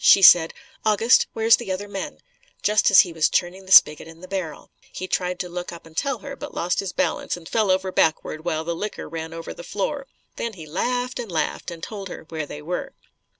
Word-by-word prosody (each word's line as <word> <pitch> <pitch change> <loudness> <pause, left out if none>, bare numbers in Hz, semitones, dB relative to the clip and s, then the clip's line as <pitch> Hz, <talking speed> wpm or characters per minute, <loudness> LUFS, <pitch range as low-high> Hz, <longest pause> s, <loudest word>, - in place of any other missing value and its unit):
She 195 - +7
said, 170 -2 +8 0.3
"August, 220 +3 +4
where's 225 0 +5
the 225 -5 -5
other 195 +2 -3
men?" 195 -1 -6 0.4
just 210 0 +4
as 195 - +9
he 175 - -4
was 160 -1 +2
turning 185 +2 -1
the - - -9
spigot 150 -3 +7
in 165 0 -13
the 185 - -10
barrel. 180 -7 -5 0.2
He 185 - -6
tried 180 -1 -1
to 180 - -4
look 175 0 -6
up 170 -1 -11
and 160 -1 -16
tell 275 - -1
her, 275 0 -6
but 290 - -9
lost 175 +1 0
his 195 -2 -2
balance - - -1
and 165 -2 -12
fell 215 0 +1
over 185 0 +1
backward 160 -2 0
while 160 -2 -1
the 170 +1 -3
liquor 210 +4 -5
ran 160 0 -6
over 165 0 -7
the - - -10
floor. 270 - -3 0.3
Then 235 - -3
he 165 -5 -10
laughed 245 +11 -2
and 230 -6 -5
laughed 160 +2 -2
and 170 -1 -9
told 200 -3 -6
her - - -8
where 155 -2 -4
they 150 +1 -8
were. 180 +3 -4
185 Hz, 230 wpm, -23 LUFS, 165-210 Hz, 0.4 s, as